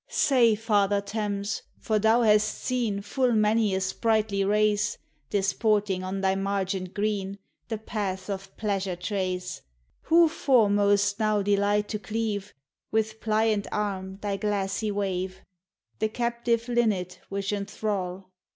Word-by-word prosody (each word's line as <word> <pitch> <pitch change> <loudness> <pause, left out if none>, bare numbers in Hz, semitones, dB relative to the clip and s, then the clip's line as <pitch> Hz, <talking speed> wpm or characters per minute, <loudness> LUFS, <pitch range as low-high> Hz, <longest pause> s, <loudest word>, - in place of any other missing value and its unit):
Say, 240 -5 +4
Father 205 -2 +2
Thames, 205 0 -3 0.2
for 215 -2 0
thou 220 +3 +4
hast 215 -1 +5
seen 230 -6 -1
Full 250 +3 +1
many 215 -1 +3
a - - +1
sprightly 215 0 +1
race, 210 +1 +2 0.3
Disporting 200 -1 +1
on 190 +1 -3
thy 190 0 +2
margent 195 -1 -2
green, 200 -2 -1 0.3
The 225 - -3
paths* 195 -3 -4
of 195 -1 -6
pleasure 195 -4 -1
trace; 180 -1 -3 0.4
Who 335 +1 +6
foremost 205 -8 +3
now 215 -2 +2
delight 205 +1 +2
to 210 - -2
cleave, 210 -1 -3 0.4
With 220 0 -1
pliant 215 -1 +1
arm, 190 -2 -3
thy 200 -1 -1
glassy 200 +1 -1
wave? 190 -2 -2 0.6
The 220 - +1
captive 235 0 -1
linnet 215 -7 0
which 200 +1 -2
enthrall? 195 -2 -3
205 Hz, 125 wpm, -27 LUFS, 195-220 Hz, 0.6 s, Who